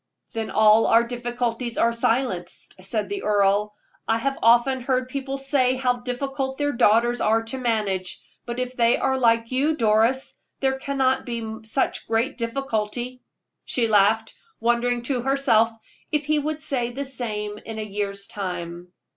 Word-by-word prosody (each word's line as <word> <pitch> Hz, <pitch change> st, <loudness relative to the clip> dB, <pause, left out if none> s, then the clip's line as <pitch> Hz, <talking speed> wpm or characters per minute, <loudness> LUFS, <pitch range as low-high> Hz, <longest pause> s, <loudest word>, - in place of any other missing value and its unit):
"Then 225 Hz, -1 st, -3 dB
all 215 Hz, +1 st, +5 dB
our 230 Hz, +1 st, +5 dB
difficulties 240 Hz, 0 st, -3 dB
are 235 Hz, 0 st, +3 dB
silenced," 225 Hz, -7 st, -1 dB
said 210 Hz, +3 st, -2 dB
the 400 Hz, -1 st, -4 dB
earl. 205 Hz, 0 st, +2 dB, 0.3 s
"I 225 Hz, -, +2 dB
have 270 Hz, +4 st, -1 dB
often 240 Hz, +3 st, +4 dB
heard 255 Hz, 0 st, 0 dB
people 275 Hz, 0 st, -4 dB
say 270 Hz, -2 st, +1 dB
how 250 Hz, -1 st, +1 dB
difficult 265 Hz, +2 st, -3 dB
their 290 Hz, 0 st, 0 dB
daughters 240 Hz, 0 st, +3 dB
are 225 Hz, +1 st, +2 dB
to 230 Hz, +4 st, -5 dB
manage; 210 Hz, -7 st, -1 dB, 0.3 s
but 240 Hz, +1 st, -4 dB
if 255 Hz, 0 st, -3 dB
they 235 Hz, -1 st, +3 dB
are 265 Hz, 0 st, 0 dB
like 230 Hz, -1 st, +2 dB
you, 290 Hz, +5 st, +1 dB
Doris, 230 Hz, +4 st, +2 dB, 0.2 s
there 265 Hz, 0 st, 0 dB
cannot 265 Hz, -1 st, 0 dB
be 225 Hz, -2 st, -4 dB
such 225 Hz, +5 st, -1 dB
great 230 Hz, +5 st, 0 dB
difficulty." 240 Hz, 0 st, -3 dB, 0.4 s
She 235 Hz, -3 st, +1 dB
laughed, 215 Hz, +1 st, +3 dB, 0.3 s
wondering 240 Hz, +1 st, +1 dB
to 250 Hz, -1 st, -1 dB
herself 255 Hz, -4 st, +3 dB, 0.4 s
if 300 Hz, -1 st, 0 dB
he 305 Hz, 0 st, +2 dB
would 305 Hz, +1 st, -3 dB
say 250 Hz, -6 st, -1 dB
the 275 Hz, +4 st, -4 dB
same 210 Hz, -5 st, -4 dB
in 225 Hz, -1 st, -8 dB
a 215 Hz, -, -3 dB
year's 200 Hz, -1 st, -4 dB
time. 180 Hz, -3 st, -6 dB
240 Hz, 155 wpm, -24 LUFS, 220-265 Hz, 0.4 s, all